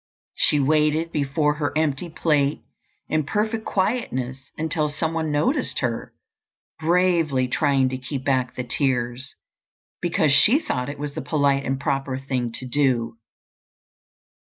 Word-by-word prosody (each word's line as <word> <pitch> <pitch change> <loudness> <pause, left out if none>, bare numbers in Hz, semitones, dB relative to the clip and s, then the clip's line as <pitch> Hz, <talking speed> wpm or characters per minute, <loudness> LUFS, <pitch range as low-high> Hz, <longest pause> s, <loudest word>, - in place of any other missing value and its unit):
She 150 - +2
waited 155 +3 +2
before 150 +1 +1
her 145 -3 -1
empty 155 +2 0
plate 150 -3 +1 0.4
in 155 0 +1
perfect 215 +8 -1
quietness 135 - -2
until 155 -1 0
some 160 +2 -2
one 160 -1 -1
noticed 240 - 0
her, 120 -3 -2 0.7
bravely 165 -5 +2
trying 135 -1 +2
to 130 0 -4
keep 130 0 -5
back 130 -3 +1
the 125 - -3
tears, 125 0 -1 0.7
because 170 -3 +2
she 210 - +6
thought 125 - -3
it 145 - -6
was 145 0 -5
the - - -4
polite 140 -3 +1
and 135 +1 -1
proper 135 -2 -1
thing 130 -3 -2
to 130 - -5
do. 120 -4 0
145 Hz, 135 wpm, -23 LUFS, 130-160 Hz, 0.7 s, she